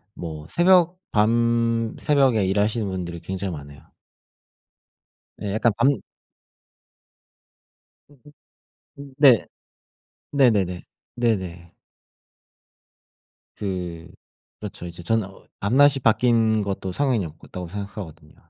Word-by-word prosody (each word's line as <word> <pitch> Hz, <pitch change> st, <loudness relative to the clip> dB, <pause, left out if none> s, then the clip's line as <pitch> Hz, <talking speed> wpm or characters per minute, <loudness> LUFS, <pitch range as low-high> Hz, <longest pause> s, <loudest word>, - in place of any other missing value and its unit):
뭐 80 Hz, -3 st, -7 dB
새벽 180 Hz, -, +4 dB
밤 115 Hz, +1 st, +1 dB
새벽에 135 Hz, -8 st, +3 dB
일하시는 105 Hz, +3 st, 0 dB
분들이 90 Hz, -2 st, -5 dB
굉장히 95 Hz, -1 st, -4 dB
많아요. 70 Hz, -1 st, -11 dB, 1.6 s
예 100 Hz, -, -3 dB
약간 110 Hz, +1 st, +2 dB
밤 125 Hz, +1 st, +3 dB, 2.1 s
으음. 145 Hz, -, -21 dB, 0.8 s
음 140 Hz, -1 st, -10 dB
네. 140 Hz, -5 st, +6 dB, 0.9 s
네네네. 105 Hz, -11 st, +2 dB, 0.3 s
네네. 95 Hz, -8 st, -2 dB, 1.8 s
그 90 Hz, -4 st, -5 dB, 0.5 s
그렇죠. 105 Hz, -4 st, -7 dB
이제 85 Hz, 0 st, -8 dB
저는 110 Hz, +1 st, 0 dB
어 95 Hz, -, -17 dB
'밤낮이 135 Hz, +7 st, +4 dB
바뀌는 115 Hz, -1 st, +3 dB
것도 95 Hz, -1 st, -4 dB
상관이 125 Hz, -4 st, 0 dB
없다.'고 85 Hz, +3 st, -9 dB
생각하거든요. 90 Hz, -6 st, -8 dB
105 Hz, 200 characters per minute, -23 LUFS, 90-120 Hz, 2.1 s, 네